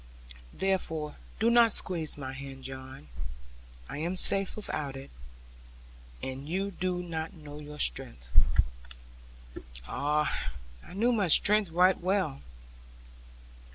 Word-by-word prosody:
Therefore 160 Hz, -6 st, -1 dB, 0.2 s
do 225 Hz, +2 st, +4 dB
not 235 Hz, -1 st, +6 dB
squeeze 165 Hz, -7 st, 0 dB
my 135 Hz, -2 st, -5 dB
hand, 135 Hz, 0 st, -8 dB
John; 130 Hz, -, -9 dB, 0.8 s
I -, -, -6 dB
am 175 Hz, +4 st, -2 dB
safe 195 Hz, +1 st, +6 dB
without 150 Hz, -9 st, -4 dB
it, 135 Hz, 0 st, -9 dB, 1.1 s
and 135 Hz, +3 st, -5 dB
you 195 Hz, +3 st, -1 dB
do 180 Hz, -1 st, -2 dB
not 160 Hz, -2 st, -4 dB
know 150 Hz, -2 st, -10 dB
your 150 Hz, 0 st, -9 dB
strength.' -, -, -2 dB, 1.6 s
Ah, 150 Hz, -, 0 dB, 0.3 s
I -, -, -12 dB
knew 235 Hz, +5 st, +3 dB
my 205 Hz, -5 st, +2 dB
strength 205 Hz, +4 st, +6 dB
right 180 Hz, +3 st, +4 dB
well. 185 Hz, -, 0 dB
160 Hz, 115 wpm, -30 LUFS, 140-190 Hz, 1.6 s, not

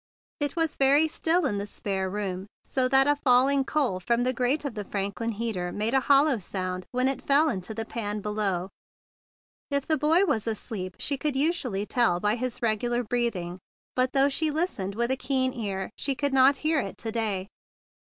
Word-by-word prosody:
It 290 Hz, +1 st, -1 dB
was 325 Hz, -2 st, 0 dB
very 280 Hz, +3 st, +5 dB
still 330 Hz, +2 st, +1 dB
in 205 Hz, -7 st, -1 dB
the 200 Hz, -, -4 dB
spare 195 Hz, -2 st, -3 dB
room, 190 Hz, -1 st, -4 dB, 0.2 s
so 260 Hz, -1 st, 0 dB
still -, -, -7 dB
that 270 Hz, +1 st, +5 dB
a 290 Hz, +1 st, +3 dB
falling 270 Hz, 0 st, +3 dB
coal 265 Hz, -10 st, 0 dB
from 235 Hz, +6 st, 0 dB
the 255 Hz, +1 st, +1 dB
grate 255 Hz, +5 st, 0 dB
of 280 Hz, -, -3 dB
the 210 Hz, -1 st, -5 dB
Franklin 200 Hz, +4 st, -3 dB
heater 200 Hz, -5 st, -3 dB
made 215 Hz, +5 st, -1 dB
a 265 Hz, -, +5 dB
hollow 275 Hz, -1 st, +4 dB
sound 185 Hz, -1 st, -4 dB
when 255 Hz, +1 st, +1 dB
it 270 Hz, -, -1 dB
fell 290 Hz, +3 st, +4 dB
into 195 Hz, -1 st, -4 dB
the 225 Hz, 0 st, -4 dB
pan 210 Hz, -3 st, -4 dB
below. 200 Hz, -3 st, -2 dB, 1.0 s
If 280 Hz, -2 st, -1 dB
the 315 Hz, -3 st, 0 dB
boy 325 Hz, +6 st, +4 dB
was 235 Hz, -, -1 dB
asleep, 205 Hz, -4 st, -4 dB
she 280 Hz, -, -1 dB
could 300 Hz, -2 st, 0 dB
usually 265 Hz, -, 0 dB
tell 220 Hz, -7 st, +2 dB
by 210 Hz, +2 st, +1 dB
his 250 Hz, 0 st, -3 dB
regular 240 Hz, +2 st, 0 dB
breathing; 210 Hz, -7 st, -2 dB, 0.4 s
but, 255 Hz, 0 st, +1 dB
though 275 Hz, 0 st, +4 dB
she 310 Hz, +3 st, +1 dB
listened 290 Hz, -, -2 dB
with 235 Hz, +2 st, 0 dB
a -, -, +3 dB
keen 260 Hz, -1 st, +1 dB
ear, 195 Hz, -4 st, -4 dB
she 275 Hz, -, 0 dB
could 285 Hz, +1 st, -1 dB
not 270 Hz, +1 st, +5 dB
hear 315 Hz, -1 st, +3 dB
it 195 Hz, -7 st, -5 dB
to 225 Hz, -, -4 dB
day. 210 Hz, -4 st, -2 dB
240 Hz, 200 wpm, -26 LUFS, 205-275 Hz, 1.0 s, very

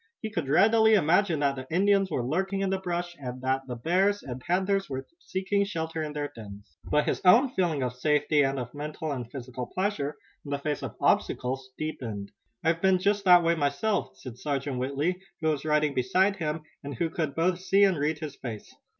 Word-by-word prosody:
He 220 Hz, -, -5 dB
could 165 Hz, -9 st, -3 dB
readily 220 Hz, +7 st, +5 dB
imagine 175 Hz, -2 st, +3 dB
that 140 Hz, -1 st, +2 dB
the 130 Hz, 0 st, -7 dB
Indians 195 Hz, +2 st, +3 dB
were 120 Hz, -, -1 dB
lurking 190 Hz, +8 st, -1 dB
in 195 Hz, -1 st, 0 dB
the 190 Hz, -, 0 dB
brush, 175 Hz, -1 st, -3 dB
and 125 Hz, -2 st, -6 dB
that 130 Hz, +1 st, 0 dB
the 125 Hz, -, -4 dB
bears 190 Hz, -, +1 dB
and 130 Hz, -1 st, -6 dB
panthers 190 Hz, +5 st, 0 dB
were 135 Hz, -1 st, -4 dB
seeking 200 Hz, -, -1 dB
shelter 165 Hz, -4 st, -3 dB
in 150 Hz, -1 st, -4 dB
their 145 Hz, -1 st, -3 dB
dens. 100 Hz, -7 st, -11 dB
But 150 Hz, 0 st, +1 dB
his -, -, -1 dB
own 235 Hz, +8 st, +6 dB
feeling 165 Hz, -7 st, 0 dB
of 125 Hz, -1 st, -2 dB
safety 150 Hz, +3 st, +2 dB
and 135 Hz, 0 st, +1 dB
of 125 Hz, -2 st, -5 dB
mental 150 Hz, +1 st, -5 dB
and 125 Hz, -4 st, -4 dB
physical 125 Hz, -2 st, -6 dB
pleasure 185 Hz, -7 st, -2 dB, 0.3 s
in 145 Hz, -, -9 dB
the 140 Hz, -, 0 dB
face 145 Hz, 0 st, -3 dB
of -, -, -6 dB
obstacles 130 Hz, +1 st, 0 dB
deepened. 115 Hz, -10 st, -5 dB, 0.3 s
"I've 165 Hz, 0 st, +1 dB
been 190 Hz, -1 st, +4 dB
just 200 Hz, +2 st, 0 dB
that 180 Hz, -2 st, +7 dB
way 170 Hz, 0 st, +3 dB
myself," 145 Hz, -, -1 dB
said 125 Hz, -2 st, -10 dB
Sergeant 140 Hz, -3 st, -2 dB
Whitley, 140 Hz, +8 st, -1 dB, 0.2 s
who 160 Hz, -, +1 dB
was 150 Hz, -1 st, -1 dB
riding 150 Hz, -1 st, +2 dB
beside 185 Hz, +12 st, +2 dB
him 155 Hz, -2 st, -3 dB, 0.2 s
and 140 Hz, -1 st, -6 dB
who 165 Hz, +6 st, -1 dB
could 155 Hz, -5 st, -2 dB
both 180 Hz, +2 st, +1 dB
see 195 Hz, +2 st, +3 dB
and 195 Hz, -2 st, +4 dB
read 150 Hz, +2 st, 0 dB
his 150 Hz, -2 st, -6 dB
face. 115 Hz, -6 st, -8 dB
155 Hz, 205 wpm, -28 LUFS, 135-185 Hz, 0.3 s, that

